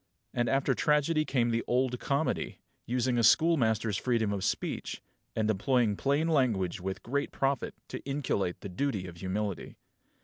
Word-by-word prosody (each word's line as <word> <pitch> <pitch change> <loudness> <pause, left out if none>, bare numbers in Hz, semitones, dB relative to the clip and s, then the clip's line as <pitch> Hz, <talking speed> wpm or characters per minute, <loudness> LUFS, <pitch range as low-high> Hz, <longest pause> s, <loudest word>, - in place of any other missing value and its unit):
And 120 0 +1
after 135 0 +2
tragedy 150 +3 +2
came 120 -4 +1
the 115 0 0
Old 125 0 +1
Comedy, 140 +3 -1 0.3
using 125 0 +1
a - - +2
schoolmaster's 115 - +4
freedom 115 -4 +1
of 100 -2 -3
speech, - - -2 0.4
and 110 -1 +1
employing 110 +1 +2
plain 140 +8 +1
language 115 - +1
with 95 +1 -4
great 140 +4 -1
profit 135 -2 -1
to - - -6
inculcate 135 -10 -1
the 100 - -6
duty 100 0 -1
of 85 -2 -9
humility. 95 +1 -3
120 Hz, 150 wpm, -30 LUFS, 105-140 Hz, 0.4 s, schoolmaster's